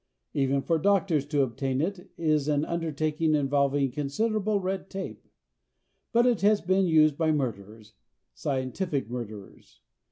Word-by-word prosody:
Even 135 Hz, -1 st, +1 dB
for 165 Hz, -1 st, +1 dB
doctors 180 Hz, -6 st, +2 dB
to 145 Hz, -2 st, +2 dB
obtain 130 Hz, +1 st, -2 dB
it 180 Hz, +4 st, -3 dB
is 155 Hz, -3 st, +1 dB
an 150 Hz, 0 st, +1 dB
undertaking 155 Hz, -1 st, 0 dB
involving 140 Hz, -1 st, +1 dB
considerable 205 Hz, -, 0 dB
red 190 Hz, 0 st, -3 dB
tape. 190 Hz, -1 st, -7 dB, 0.8 s
But 235 Hz, +1 st, +4 dB
it 245 Hz, -4 st, +2 dB
has 205 Hz, +1 st, +4 dB
been 190 Hz, +1 st, +2 dB
used 155 Hz, -2 st, +4 dB
by 160 Hz, -1 st, +3 dB
murderers 110 Hz, -6 st, -4 dB, 0.4 s
scientific 130 Hz, -, -2 dB
murderers. 110 Hz, -5 st, -8 dB
150 Hz, 130 wpm, -27 LUFS, 135-185 Hz, 0.8 s, But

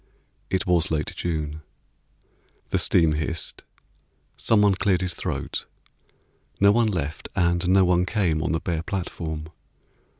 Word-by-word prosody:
It 95 Hz, -1 st, 0 dB
was 85 Hz, -3 st, +2 dB
late 75 Hz, -2 st, -2 dB
June. 75 Hz, -3 st, -3 dB, 1.1 s
The -, -, +1 dB
steam 80 Hz, -3 st, +4 dB
hissed. 75 Hz, +1 st, -2 dB, 0.7 s
Someone 105 Hz, -3 st, +3 dB
cleared 95 Hz, -1 st, +1 dB
his 90 Hz, -1 st, 0 dB
throat. -, -, -4 dB, 0.9 s
No 100 Hz, 0 st, +6 dB
one 115 Hz, +1 st, +3 dB
left 80 Hz, -7 st, -3 dB
and 85 Hz, +1 st, +1 dB
no 95 Hz, 0 st, +5 dB
one 90 Hz, 0 st, +2 dB
came 90 Hz, -7 st, +1 dB
On 85 Hz, -, -1 dB
the 80 Hz, -, 0 dB
bare 85 Hz, -2 st, -2 dB
platform. 80 Hz, -4 st, -4 dB
85 Hz, 130 wpm, -24 LUFS, 80-95 Hz, 1.1 s, No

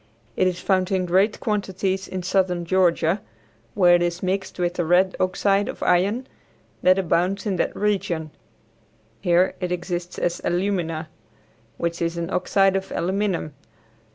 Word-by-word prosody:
It 185 Hz, -, +2 dB
is 180 Hz, -1 st, -2 dB
found 185 Hz, -1 st, +1 dB
in 185 Hz, -1 st, +1 dB
great 190 Hz, +4 st, +2 dB
quantities 195 Hz, -2 st, -2 dB
in 185 Hz, -1 st, -5 dB
southern 180 Hz, -2 st, 0 dB
Georgia, 175 Hz, 0 st, +2 dB, 0.5 s
where 180 Hz, -2 st, +5 dB
it 175 Hz, -, +4 dB
is 175 Hz, +1 st, -1 dB
mixed 190 Hz, +1 st, -2 dB
with 175 Hz, -1 st, 0 dB
the 175 Hz, -, -1 dB
red 180 Hz, +3 st, +3 dB
oxide 195 Hz, +2 st, +1 dB
of -, -, -6 dB
iron 200 Hz, +8 st, +2 dB, 0.6 s
that 185 Hz, +1 st, +5 dB
abounds 190 Hz, +2 st, 0 dB
in 195 Hz, -3 st, -1 dB
that -, -, -1 dB
region. 180 Hz, -6 st, -1 dB, 0.9 s
Here, 175 Hz, +4 st, +3 dB
it 180 Hz, -1 st, -3 dB
exists 175 Hz, 0 st, -4 dB
as 175 Hz, 0 st, -1 dB
alumina, 175 Hz, -3 st, -1 dB, 0.7 s
which 170 Hz, 0 st, -2 dB
is 170 Hz, 0 st, -1 dB
an 170 Hz, +2 st, -3 dB
oxide 195 Hz, +1 st, +2 dB
of 195 Hz, 0 st, -3 dB
aluminum. 185 Hz, -3 st, -1 dB
185 Hz, 150 wpm, -23 LUFS, 175-195 Hz, 0.9 s, where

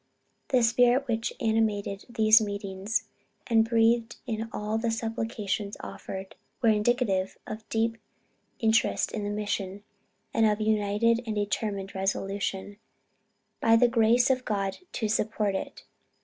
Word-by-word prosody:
The 255 Hz, -3 st, +3 dB
spirit 245 Hz, +4 st, +4 dB
which 225 Hz, -1 st, -1 dB
animated 215 Hz, -3 st, 0 dB
these 220 Hz, -1 st, +5 dB
meetings, 200 Hz, 0 st, -3 dB, 0.4 s
and 225 Hz, -2 st, +3 dB
breathed 230 Hz, 0 st, +3 dB
in 225 Hz, -2 st, -3 dB
all 210 Hz, +1 st, -2 dB
the 230 Hz, 0 st, 0 dB
supplications 225 Hz, -3 st, -3 dB
offered, 190 Hz, 0 st, -7 dB, 0.3 s
was 230 Hz, -3 st, +4 dB
indicative 210 Hz, -3 st, +1 dB
of 215 Hz, +1 st, -8 dB
deep 225 Hz, 0 st, 0 dB, 0.6 s
interest 225 Hz, -1 st, +2 dB
in 210 Hz, -, -3 dB
the 205 Hz, -, -2 dB
mission, 205 Hz, -1 st, -3 dB, 0.5 s
and 225 Hz, -1 st, +4 dB
of 210 Hz, 0 st, +1 dB
united 215 Hz, +2 st, +2 dB
and 215 Hz, -, -2 dB
determined 205 Hz, -1 st, -2 dB
resolution, 195 Hz, +1 st, -2 dB, 0.8 s
by 225 Hz, -, +5 dB
the 240 Hz, +2 st, +5 dB
grace 235 Hz, +2 st, +4 dB
of 255 Hz, -1 st, 0 dB
God 195 Hz, -3 st, -2 dB, 0.2 s
to 220 Hz, -, -1 dB
support 210 Hz, -1 st, 0 dB
it. 190 Hz, -, -5 dB
220 Hz, 130 wpm, -28 LUFS, 205-230 Hz, 0.8 s, these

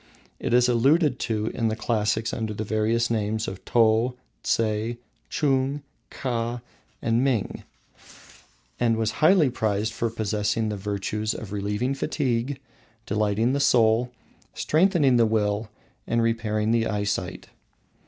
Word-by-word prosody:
It -, -, -3 dB
is 125 Hz, +1 st, +5 dB
alluded 135 Hz, +3 st, +3 dB
to 110 Hz, -1 st, -1 dB
in 115 Hz, -, 0 dB
the 110 Hz, -, 0 dB
classics 110 Hz, 0 st, 0 dB
under 110 Hz, -2 st, -3 dB
the 110 Hz, -, -3 dB
various 110 Hz, +2 st, 0 dB
names 110 Hz, 0 st, -1 dB
of 95 Hz, 0 st, -7 dB
Tou, 115 Hz, +2 st, +3 dB, 0.3 s
Tseh, 110 Hz, +1 st, 0 dB, 0.3 s
Chung, 140 Hz, -1 st, 0 dB, 0.3 s
Kha, 120 Hz, -2 st, -3 dB, 0.4 s
and 115 Hz, +2 st, +2 dB
Ming, 130 Hz, -7 st, -1 dB, 1.2 s
and 115 Hz, -2 st, +2 dB
was 110 Hz, -1 st, 0 dB
highly 155 Hz, -4 st, +5 dB
prized 110 Hz, -2 st, -1 dB
for 115 Hz, +1 st, -1 dB
possessing 110 Hz, 0 st, -1 dB
the 105 Hz, -, -2 dB
virtues 105 Hz, +2 st, -3 dB
of 105 Hz, -4 st, -7 dB
relieving 105 Hz, +5 st, -1 dB
fatigue, 135 Hz, -2 st, -1 dB, 0.5 s
delighting 105 Hz, +4 st, +1 dB
the 140 Hz, -, 0 dB
soul, 120 Hz, -2 st, +3 dB, 0.4 s
strengthening 155 Hz, -6 st, +3 dB
the 115 Hz, -1 st, +4 dB
will, 105 Hz, 0 st, 0 dB, 0.4 s
and 115 Hz, 0 st, +1 dB
repairing 110 Hz, -1 st, 0 dB
the 115 Hz, -1 st, +2 dB
eyesight. 105 Hz, -1 st, -3 dB
115 Hz, 130 wpm, -25 LUFS, 110-125 Hz, 1.2 s, is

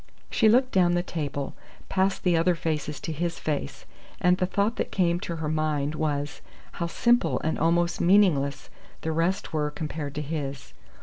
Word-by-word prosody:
She 220 Hz, -, +4 dB
looked 255 Hz, +3 st, +4 dB
down 180 Hz, -2 st, +4 dB
the 175 Hz, -, +1 dB
table, 145 Hz, -5 st, -4 dB, 0.3 s
past 190 Hz, 0 st, 0 dB
the 180 Hz, -2 st, +3 dB
other 170 Hz, +2 st, +3 dB
faces 155 Hz, -2 st, -3 dB
to 165 Hz, -, -4 dB
his 170 Hz, +2 st, -2 dB
face, 150 Hz, -2 st, -3 dB, 0.3 s
and 180 Hz, 0 st, +4 dB
the 185 Hz, -, +1 dB
thought 200 Hz, +4 st, 0 dB
that -, -, -2 dB
came 175 Hz, -2 st, +2 dB
to 170 Hz, -, -4 dB
her 160 Hz, -1 st, -3 dB
mind 150 Hz, -2 st, 0 dB
was, 145 Hz, -2 st, -2 dB, 0.3 s
how 170 Hz, -, -3 dB
simple 240 Hz, +8 st, +2 dB
and 160 Hz, -, -1 dB
almost 170 Hz, +2 st, +2 dB
meaningless 175 Hz, -7 st, +3 dB, 0.3 s
the 160 Hz, -, -2 dB
rest 165 Hz, +4 st, -1 dB
were 150 Hz, -1 st, 0 dB
compared 150 Hz, -1 st, -5 dB
to 150 Hz, -, -2 dB
his. 140 Hz, -3 st, -5 dB
165 Hz, 175 wpm, -26 LUFS, 150-180 Hz, 0.3 s, She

